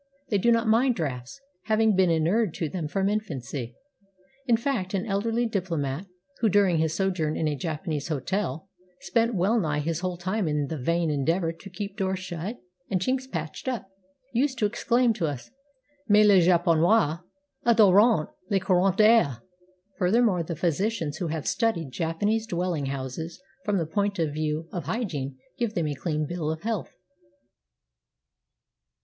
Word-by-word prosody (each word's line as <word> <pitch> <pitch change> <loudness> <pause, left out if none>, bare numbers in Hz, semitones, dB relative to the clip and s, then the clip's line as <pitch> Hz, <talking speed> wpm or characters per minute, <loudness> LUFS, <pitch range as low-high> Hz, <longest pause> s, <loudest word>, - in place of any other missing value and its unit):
They 205 - +2
do 235 +5 +3
not 230 0 +2
mind 240 +3 +4
drafts, 135 - -4 0.3
having 220 -1 +3
been 185 -1 +4
inured 170 +4 +1
to 165 - -2
them 165 -1 -4
from 195 +5 0
infancy. 140 - -3 0.7
In 235 -2 +4
fact 225 -7 -2
an 185 - -1
elderly 225 +3 0
diplomat, 170 - -2 0.3
who, 225 - +3
during 195 -4 +3
his 160 -1 0
sojourn 180 -6 0
in 160 - 0
a 150 - 0
Japanese 155 0 -3
hotel, 165 +4 -2 0.3
spent 230 +5 +1
well 200 +6 +2
nigh 155 -6 0
his 155 +2 -1
whole 180 -1 -3
time 185 +2 -1
in 150 -1 0
the 160 - -3
vain 165 +4 +1
endeavor 165 +4 0
to 165 +4 -12
keep 200 +1 -6
doors 190 -2 0
shut 185 +4 -5 0.3
and 190 - +1
chinks 260 +7 -1
patched 160 +4 -5
up, 240 -6 -3 0.4
used 260 +2 +1
to 220 - +1
exclaim 235 +3 +2
to 185 -7 -1
us, 140 -5 -6 0.6
"Mais 210 +1 +6
les 200 -3 +6
japonais 170 0 +3 0.4
adorent 215 -5 +5 0.2
les 195 - +2
courants 185 0 +2
d'air!" 215 - +4 0.6
Furthermore 200 0 +3
the 165 0 -4
physicians 170 -1 -1
who 175 - -2
have 155 -1 -3
studied 170 - 0
Japanese 205 - -1
dwelling 175 -6 -1
houses 135 +4 -5 0.2
from 205 -2 +1
the 165 - 0
point 200 +4 -1
of 160 -4 0
view 155 +1 -2
of 175 -5 -4
hygiene 145 - -3 0.2
give 235 -3 -1
them 170 - 0
a 150 - -1
clean 155 +1 -2
bill 165 -1 -3
of 160 +2 -4
health. 220 -4 -2
180 Hz, 160 wpm, -26 LUFS, 155-215 Hz, 0.7 s, Mais